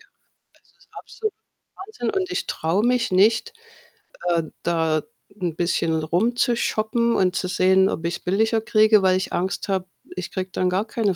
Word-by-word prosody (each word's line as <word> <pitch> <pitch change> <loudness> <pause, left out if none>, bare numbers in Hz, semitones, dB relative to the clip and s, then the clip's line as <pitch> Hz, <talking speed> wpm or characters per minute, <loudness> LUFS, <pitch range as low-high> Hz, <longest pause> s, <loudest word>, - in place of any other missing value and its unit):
Ja, - - -22 0.6
es - - -32
ist - - -26
absolut 435 -2 -6 0.4
Wahnsinn 435 +3 -4
und 385 -2 -2
ich 380 +2 -2
traue 170 +7 0
mich 250 -1 +1
nicht, 220 +4 +3 0.8
ähm, 165 -2 -2
da 160 -2 +1 0.4
'n 170 -3 -2
bisschen 165 -2 0
rumzushoppen 235 - +1
und 185 -1 +2
zu 185 - -1
sehen, 190 +1 +3
ob 165 - -4
ich's 170 +1 -2
billiger 220 +4 +1
kriege, 215 -1 +4
weil 185 -1 +3
ich 190 - -4
Angst 180 +1 -2
habe, 190 -2 -1 0.3
ich 185 -1 -5
kriege 185 0 -4
dann 185 0 0
gar 190 +4 0
keine 210 -4 -1
190 Hz, 165 wpm, -23 LUFS, 180-230 Hz, 0.8 s, kriege